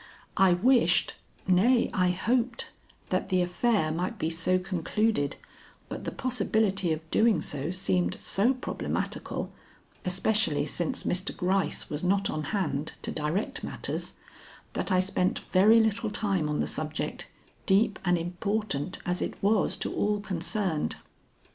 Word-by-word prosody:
I 190 -3 +5
wished 180 -3 +3 0.3
nay, 225 +7 +4
I 180 -1 +2
hoped 235 +6 0 0.4
that - - -1
the 185 -2 +3
affair 180 -2 +1
might 180 +7 -2
be 160 -3 -1
so 175 +3 +1
concluded, 185 -3 0 0.5
but - - -6
the - - -2
possibility 215 -7 +1
of 160 0 -3
doing 225 -1 +4
so 145 +1 -3
seemed 90 - 0
so 235 +7 +2
problematical, 255 - -3 0.5
especially 180 -4 +1
since 160 +2 -2
Mr. 185 +2 0
Gryce 190 +1 0
was 150 +2 -3
not 195 +2 +2
on 155 0 -3
hand 155 -8 -2
to - - -3
direct 155 +7 -2
matters, - - -3 0.6
that - - -2
I 185 0 +4
spent 185 -1 0
very 210 +5 +6
little 220 0 +1
time 195 -7 0
on 150 - 0
the - - 0
subject, 155 0 -4 0.4
deep 205 +1 +3
and 180 -1 +3
important 180 -1 -2
as 180 0 -1
it - - -2
was 205 0 +3
to - - -3
all 210 0 +1
concerned. 185 -3 -2
185 Hz, 140 wpm, -28 LUFS, 170-215 Hz, 0.6 s, very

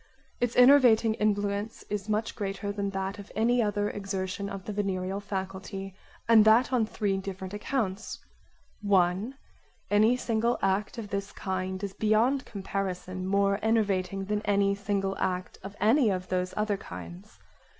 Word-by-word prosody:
Its 245 -1 0
enervating 245 -4 +6
influence 205 0 -1
is 210 0 -4
much 215 +1 -1
greater 200 0 -3
than 200 -1 -2
that 195 +1 -4
of 200 - -11
any 240 +3 +3
other 205 -1 0
exertion 195 -1 -4
of 195 -1 -7
the 210 - -4
venereal 195 -1 -2
faculty, 195 -1 -5 0.3
and 225 -2 +7
that 230 +4 +5
on 230 -4 +2
three 200 -3 -1
different 190 0 -6
accounts: 210 -2 -2 0.6
1) 195 +4 +2 0.6
Any 215 +4 +4
single 235 0 0
act 195 +4 0
of 220 -3 -6
this 200 0 -3
kind 190 0 -4
is 200 -1 -3
beyond 230 +6 +2
comparison 185 -2 -4
more 200 +1 +2
enervating 195 -3 0
than 210 +1 -1
any 200 -1 +2
single 200 -1 -1
act 180 0 -2
of 195 +1 -9
any 230 +3 +4
of 185 -2 -2
those 185 0 -1
other 210 -1 0
kinds. 90 - -10
200 Hz, 150 wpm, -28 LUFS, 190-215 Hz, 0.6 s, and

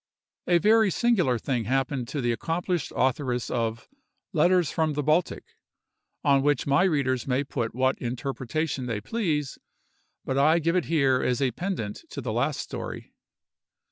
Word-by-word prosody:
A 175 - +5
very 215 +3 +4
singular 185 - +2
thing 120 -2 -2
happened 130 +1 -1
to 140 +2 -3
the 120 -1 +1
accomplished 170 +5 -2
authoress 130 -1 0
of 115 -2 -2 0.5
"Letters 175 0 +3
from 160 -2 0
the 150 0 -2
Baltic," 155 +4 +1 0.8
on 140 -1 +4
which 145 -1 +1
my 140 +6 +3
readers 135 -8 0
may 130 +1 +1
put 120 -5 -3
what 130 +1 +1
interpretation 130 +3 -3
they 115 -3 -2
please, 150 - -2 0.7
but 135 +1 0
I 155 +4 +5
give 165 +1 +1
it 180 - +1
here 135 -5 +2
as 125 +1 0
a 135 -2 +1
pendant 145 - -4
to - - -6
the - - -3
last - - 0
story. - - -7
140 Hz, 155 wpm, -26 LUFS, 125-165 Hz, 0.8 s, A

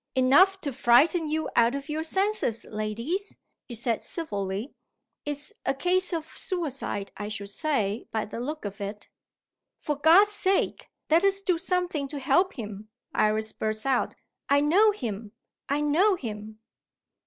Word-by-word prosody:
"Enough 290 +10 +5
to 285 -4 -3
frighten 295 +7 +4
you 315 +1 -1
out 235 +3 +4
of 280 +1 -5
your 310 +1 -2
senses, 380 - +1
ladies," 230 - -4 0.3
he 240 - -6
said 230 0 0
civilly. 205 - -4 0.5
"It's 295 +6 -4
a 270 - 0
case 365 +6 +2
of 325 -3 -2
suicide, 275 - -3
I 205 - -4
should 205 -1 -5
say, 225 -7 -1
by 220 -1 -1
the 220 - -7
look 300 +2 -5
of 205 0 -6
it." 205 +1 -6 0.7
"For 295 - -2
God's 335 +8 +6
sake, 390 -2 0 0.2
let 330 +3 +5
us 395 0 +2
do 365 -4 0
something 360 -5 -1
to 290 +1 -6
help 360 +8 +2
him!" 215 -3 -8 0.2
Iris 215 +1 +1
burst 215 +1 -2
out. 265 -2 +1 0.3
"I 280 0 +5
know 355 +10 +5
him! 220 - -4 0.4
I 285 +2 +1
know 345 +8 +3
him!" 215 - -7
280 Hz, 155 wpm, -27 LUFS, 220-345 Hz, 0.7 s, God's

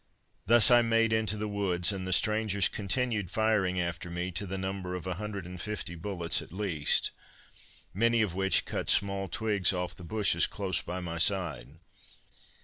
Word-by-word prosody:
Thus 115 +1 +6
I 120 0 +7
made 115 -1 +2
into 110 -1 0
the 105 +1 -3
woods, 100 -2 0
and 95 -1 -5
the - - -3
strangers 105 -1 +3
continued 110 -1 -1
firing 100 -3 +1
after 85 0 -3
me, 90 +2 -3
to 95 +4 -2
the 95 +1 -4
number 95 -1 -4
of 90 - -6
150 95 0 -5
bullets 85 -1 -1
at - - -12
least, 90 -6 +1 0.8
many 115 +3 +2
of 100 -5 -2
which 95 +1 +1
cut - - -3
small 100 -1 +2
twigs 105 0 +1
off 90 -1 -3
the 90 - -13
bushes 100 -1 +2
close 95 -5 -2
by 90 +2 -5
my 85 -1 -5
side. 85 -7 0
95 Hz, 160 wpm, -29 LUFS, 90-105 Hz, 0.8 s, I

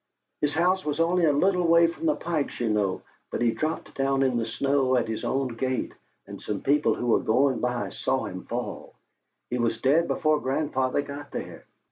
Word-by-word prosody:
His 145 0 0
house 180 +3 +2
is 150 +1 -1
only 170 +1 +3
a 150 - +4
little 180 +4 +2
way 170 0 +6
from 170 - -2
the 305 - +3
Pikes', 160 -4 -3
you 120 -2 0
know; 105 -3 0 0.3
but - - -3
he 120 -1 +3
dropped 155 +6 -3
down 135 0 +1
in 130 -2 +1
the 115 -1 -1
snow 130 +2 +1
at 120 -2 +1
his 110 -1 -4
own 135 0 0
gate, 130 +2 -2 0.3
and - - -10
some 105 -2 -4
people 145 +2 +2
who - - -4
were 120 - +3
going 130 +3 +2
by 125 -1 -1
saw - - -1
him - - -6
fall. - - -5 0.6
He 125 - -1
was 115 -1 0
dead 145 +7 +3
before 155 -1 +1
grandfather 135 0 0
got 145 0 -8
there." - - -7
135 Hz, 200 wpm, -26 LUFS, 120-155 Hz, 0.6 s, way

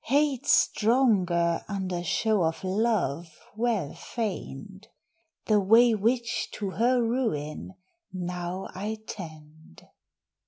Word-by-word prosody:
Hate 285 0 +1
stronger, 190 -8 +3
under 185 -4 -3
show 215 +4 +1
of 160 +2 -1
love 185 - -1 0.2
well 220 -9 -1
feigned; 195 - -6 0.6
The 215 -1 +4
way 225 +4 +5
which 230 +3 0
to 200 -2 -4
her 240 +4 +2
ruin 190 - -2 0.4
now 180 0 -4
I 210 +4 -4
tend." 155 - -11
195 Hz, 95 wpm, -27 LUFS, 175-230 Hz, 0.6 s, way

